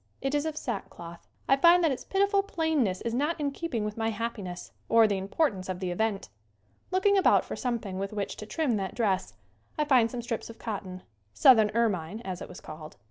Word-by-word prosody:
It 270 +1 -2
is 295 +1 +1
of 310 -1 -4
sack 235 -9 -4
cloth. 170 0 -11 0.2
I 270 - +5
find 340 +5 +6
that 320 - +3
its 260 - -4
pitiful 395 +1 +2
plainness 320 - 0
is 230 - -3
not 295 +7 0
in 285 -1 0
keeping 275 -8 -3
with 210 0 -5
my 225 0 0
happiness 210 -5 -5 0.2
or 230 -1 +6
the 200 -2 -1
importance 195 - -1
of 185 -1 -3
the 185 -2 -2
event. 200 - -1 0.6
Looking 395 +2 +3
about - - +4
for - - -5
something 225 -7 -3
with 195 0 -3
which 205 -2 -3
to 215 - -8
trim 275 -5 0
that 190 -2 -4
dress 195 -5 0 0.4
I 300 - +1
find 255 -6 +4
some 240 0 -5
strips 230 -1 -4
of 230 - -10
cotton 190 -4 -6 0.3
"southern 220 -5 +6
ermine," 205 -4 0
as 185 -6 -6
it - - -7
was 180 - -10
called. 155 0 -10
230 Hz, 210 wpm, -28 LUFS, 195-290 Hz, 0.6 s, find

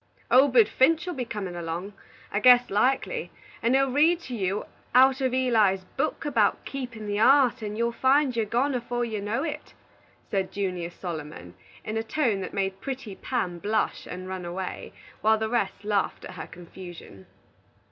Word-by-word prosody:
"Obed 255 -4 +6
Finch 320 +9 +3
will 360 - -3
be 255 -5 -3
comin' 200 -6 -5
along, 175 +4 -5 0.4
I 205 - 0
guess 245 +1 +6
likely, 265 - +1 0.3
and 235 +3 +2
he'll 270 -1 +3
read 320 +5 +4
to 255 -6 -6
you 195 -1 -1 0.3
out 260 +1 +6
uv 260 -2 0
Eli's 225 -7 +2
book 310 +3 -1
about 230 -8 +1
keepin' 245 -5 -6
the 205 0 -2
heart, 255 +1 +5
and 210 0 -4
you'll 235 +1 +1
find 265 +2 +2
your'n 225 -2 0
gone 250 +2 +1
'fore 240 0 -2
you 215 -3 -4
know 215 +7 -1
it," 305 -2 -6 0.6
said 195 -2 -1
Junius 180 -4 -3
Solomon, 155 - -7 0.3
in 215 +1 -3
a 225 - -1
tone 230 -6 0
that 185 - -5
made 195 -1 -2
pretty 260 -6 -5
Pam 185 -10 -3
blush 215 +4 -1
and 185 +1 -7
run 185 -1 -5
away, 180 +2 -5 0.3
while 220 +1 +4
the 220 0 -1
rest 205 -5 -1
laughed 205 -2 -1
at - - -8
her - - -7
confusion. 175 - -11
220 Hz, 175 wpm, -26 LUFS, 190-260 Hz, 0.6 s, Obed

